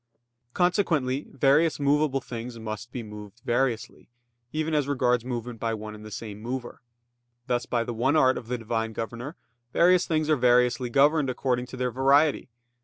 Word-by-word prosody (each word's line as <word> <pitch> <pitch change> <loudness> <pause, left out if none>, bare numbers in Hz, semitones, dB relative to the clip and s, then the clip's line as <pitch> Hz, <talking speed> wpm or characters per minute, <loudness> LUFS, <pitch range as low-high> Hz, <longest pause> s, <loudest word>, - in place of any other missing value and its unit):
Consequently, 160 -7 +1
various 140 +4 +3
movable 140 -1 +2
things 120 -1 -7
must 110 +1 -6
be 125 -2 -5
moved 105 0 -10
variously, 120 -1 -1 0.4
even 155 +1 -2
as 145 -2 +1
regards 125 -4 +1
movement 120 -2 -5
by 115 0 -1
one 110 0 -7
and 105 0 -11
the 110 - -9
same 105 0 -7
mover. 120 +1 -5 0.6
Thus 120 -2 -1
by 120 -1 0
the 120 - -4
one 130 +6 +1
art 130 -4 +4
of 115 - -7
the 125 +1 -2
Divine 115 -1 -2
governor, 120 +7 -5 0.4
various 180 +1 +4
things 155 -2 0
are 155 - +4
variously 125 -1 +3
governed 145 +2 +3
according 125 -1 -1
to 130 - -9
their 125 -1 -1
variety. 140 +3 +3
125 Hz, 170 wpm, -26 LUFS, 115-140 Hz, 0.6 s, art